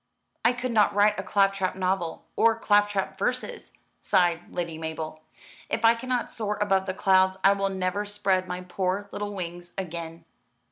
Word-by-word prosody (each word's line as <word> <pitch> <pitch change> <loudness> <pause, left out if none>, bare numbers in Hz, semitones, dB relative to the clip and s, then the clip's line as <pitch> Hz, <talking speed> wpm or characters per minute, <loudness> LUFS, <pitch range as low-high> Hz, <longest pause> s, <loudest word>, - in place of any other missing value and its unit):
"I 230 +2 +4
could 245 0 -3
not 215 -3 +3
write 210 0 +4
a - - -3
claptrap 195 -1 +1
novel, 185 -3 -2
or 230 0 +4
claptrap 205 -3 +1
verses," 485 - -2 0.3
sighed 175 -3 +1
Lady 170 -3 -4
Mabel. 160 -1 -5 0.5
"If 230 - 0
I 225 - +8
cannot 245 +1 -2
soar 210 -2 -3
above 195 -2 +1
the 185 - -2
clouds, 190 -1 +3
I 195 - +7
will 195 0 0
never 190 +1 -1
spread 200 -3 0
my 180 0 -4
poor 185 +2 -2
little 205 0 -4
wings 175 -1 -7
again." 165 -2 -6
195 Hz, 160 wpm, -26 LUFS, 180-205 Hz, 0.5 s, I